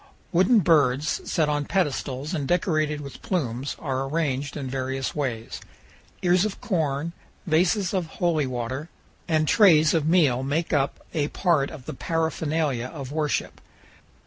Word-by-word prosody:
Wooden 190 +6 +4
birds, 150 -3 +2
set 155 -2 +2
on 145 -1 0
pedestals 145 -5 -1
and 145 -5 -2
decorated 155 -4 +1
with 140 -2 -9
plumes, 135 - -2
are 135 -2 -2
arranged 145 -3 -1
in 140 -2 -4
various 130 0 -3
ways. 120 -6 -3 0.6
Ears 180 +1 +4
of 215 -2 -3
corn, 160 -4 -1 0.3
vases 180 +4 +2
of 185 -4 0
holy 160 -6 +1
water, 130 +5 -4 0.4
and 155 -2 +2
trays 160 -7 +6
of 160 -3 +1
meal 155 -8 +3
make 150 +6 -1
up 140 -2 0
a 150 -3 0
part 155 -5 +1
of 135 -5 -10
the - - -5
paraphernalia 155 -4 -1
of 135 -1 -8
worship. 150 -1 -2
150 Hz, 145 wpm, -25 LUFS, 135-170 Hz, 0.6 s, trays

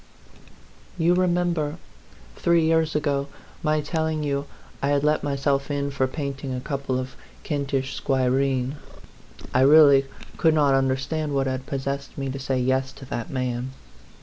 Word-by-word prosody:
You 170 +1 +3
remember, 175 -4 +1 0.6
three 170 -1 +3
years 160 -1 +2
ago, 140 -2 0 0.3
my 155 -1 +1
telling 160 0 -1
you 140 -1 -1 0.3
I 140 - +1
had 145 0 +2
let 150 +1 +2
myself 140 0 0
in 140 -1 -1
for 135 -1 0
painting 135 -1 -4
a - - -3
couple 135 -1 -2
of 130 0 -5 0.3
Kentish 140 -3 -2
squireen? 130 0 +1 0.8
I 130 - +4
really 140 -1 +7 0.3
could 160 -1 +3
not 145 -3 +4
un 135 0 +3
derstand 145 +3 -2
what 135 -1 +1
had 130 0 -3
possessed 140 0 -4
me 135 -1 -2
to 135 - -5
say 130 -1 -1
yes 130 +1 +1
to 135 0 -11
that 115 - -3
man. 125 0 -3
140 Hz, 150 wpm, -24 LUFS, 135-150 Hz, 0.8 s, really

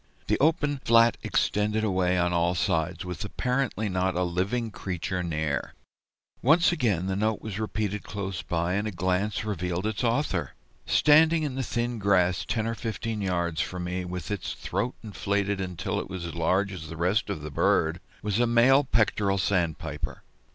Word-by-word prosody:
The - - +1
open 145 -1 +2
flat 115 0 +5
extended 105 +1 0
away 95 -3 +1
on 90 0 +1
all 85 +1 +2
sides, 85 -1 0
with 90 +4 -5
apparently 125 0 -1
not 95 -1 0
a 90 - +1
living 100 +7 -1
creature 90 -1 -3
near. 80 -4 -2 0.7
Once 165 +7 +5
again 110 - +1
the 95 0 -1
note 110 +1 0
was 105 -2 -5
repeated 105 -1 -2
close 95 -3 -5
by, 85 +1 -1
and 100 +2 0
a - - -2
glance 95 +3 -1
revealed 90 -2 -2
its 110 +2 -2
author. 120 +5 0 0.3
Standing 155 +2 +5
in 145 -3 -2
the 135 - -2
thin 120 -1 -2
grass 95 -3 +2
ten 110 -2 0
or 115 - -1
fifteen 115 -1 -4
yards 85 -4 0
from 90 -1 -4
me, 90 +1 -3
with 90 0 -5
its 100 -4 -3
throat 100 +7 -3
inflated 100 -1 -1
until 90 -3 -3
it - - -6
was 95 -3 -5
as 85 - -5
large 95 +4 +1
as 80 -4 -7
the 80 - -7
rest 90 +6 +1
of 90 -7 -4
the 75 - -6
bird, 80 +4 +2 0.2
was 105 +1 0
a 120 - +3
male 125 +4 +5
Pectoral 105 -5 +1
Sandpiper. 90 -4 -2
100 Hz, 175 wpm, -27 LUFS, 90-110 Hz, 0.7 s, flat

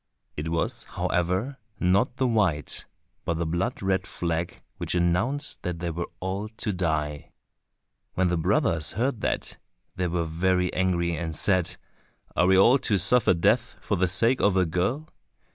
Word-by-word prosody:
It 75 +2 -4
was, 85 0 -2
however, 95 +11 -1 0.2
not 95 +7 +2
the 130 - +1
white, 95 - 0 0.4
but 85 - -1
the 85 - -1
blood 90 +9 -2
red 95 0 0
flag 85 0 -3
which - - -2
announced 90 - +1
that 90 -1 -3
they 85 0 -3
were 85 +1 -4
all 95 +3 -3
to 110 -1 -2
die. 75 -5 -2 0.8
When 95 0 +2
the 90 - +1
brothers 85 - +1
heard 120 -1 -1
that, - - -2 0.4
they 90 -1 0
were 85 -1 -1
very 90 +2 0
angry 85 -2 0
and 80 0 -4
said, 90 -2 +1 0.6
"Are 85 - +3
we 95 0 +5
all 120 +8 +6
to 105 -4 +2
suffer 100 +1 +5
death 85 - +1
for - - -1
the 95 +1 +2
sake 115 +9 +2
of 100 -2 +3
a 90 - +4
girl? 95 - -1
90 Hz, 160 wpm, -26 LUFS, 85-105 Hz, 0.8 s, all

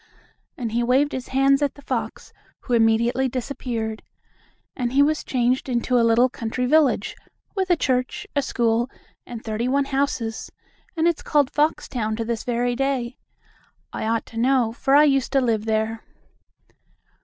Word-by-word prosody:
and 235 -4 -3
he 235 +2 0
waved 260 +5 +2
his 260 -3 -5
hands 275 +1 +3
at 285 -2 0
the 285 - -14
fox, - - -4 0.3
who 250 - -4
immediately 235 +3 +3
disappeared. 235 -3 -4 0.7
And 245 -1 -2
he 280 +1 +5
was 305 +1 0
changed 255 +1 0
into 245 0 +1
a - - +4
little 230 +2 +4
country 250 0 -3
village, 270 -6 +2 0.4
with 380 -2 -1
a 350 - +5
church, 255 -5 -1
a 285 - +3
school 235 -2 0 0.4
and 235 -2 -8
thirty 220 +2 -2
one 275 +2 +1
houses, 270 -5 -2 0.5
and 325 +1 +3
it's 340 -2 0
called 290 -3 +1
Foxtown 290 -7 -1
to 230 - -2
this 230 -1 -3
very 245 0 -1
day. 265 -2 -2 0.7
I - - -3
ought 225 0 0
to 225 - -11
know, 245 -2 +2
for 270 +3 +1
I 295 - +7
used 275 -3 +2
to 275 - +4
live 225 -4 0
there. 220 0 -1
250 Hz, 165 wpm, -23 LUFS, 230-275 Hz, 0.7 s, I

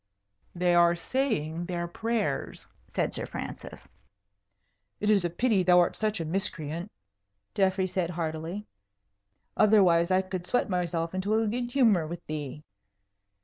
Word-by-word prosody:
"They 175 0 +2
are 170 0 +5
saying 170 - -2
their 175 -1 -2
prayers," 215 -4 -2 0.3
said - - 0
Sir - - -2
Francis. - - -7 1.2
"It 210 +1 +2
is 200 -3 +3
a 175 - 0
pity 210 +3 +2
thou 180 0 +5
art 175 - +2
such 215 -2 -1
a 165 - -2
miscreant," 170 0 -3 0.6
Geoffrey 190 -1 +2
said, 185 -2 -1
heartily; 165 +3 -4 0.9
"otherwise 185 -5 +5
I 185 0 +3
could 185 -1 -5
sweat 245 -4 0
myself 170 -2 -1
into 190 +3 0
a 225 0 +2
good 240 +3 -2
humour 225 - +3
with 170 +2 -7
thee." 150 -1 -5
180 Hz, 140 wpm, -28 LUFS, 170-210 Hz, 1.2 s, are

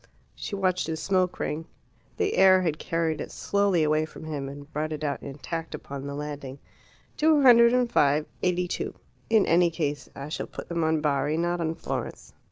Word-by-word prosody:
She 205 - -5
watched 185 -3 0
his 160 -1 -3
smoke 185 +2 +1
ring. 160 +2 -3 0.5
The 415 - 0
air 185 -1 +6
had 155 -3 -1
carried 165 -1 -1
it - - -5
slowly 200 -5 +1
away 155 0 +2
from 155 - -12
him, 145 -3 -4
and 145 +2 -11
brought 155 +1 -2
it 155 0 -4
out 145 -2 -2
intact 160 +4 -5
upon 140 0 -7
the 140 - -5
landing. 145 -2 -6 0.6
"Two 305 -2 +4
hundred 235 -2 +8
and 250 0 +3
five 150 -8 +3 0.2
eighty 180 0 +1
two. - - -4 0.3
In 220 -2 +4
any 170 +1 +4
case 150 -3 -3
I 140 +2 -7
shall 155 - -4
put - - -9
them 170 -1 -1
on 160 -1 +1
Bari, 145 0 +1
not 175 +1 0
on 160 0 -1
Florence. - - -5
160 Hz, 190 wpm, -26 LUFS, 150-185 Hz, 0.6 s, hundred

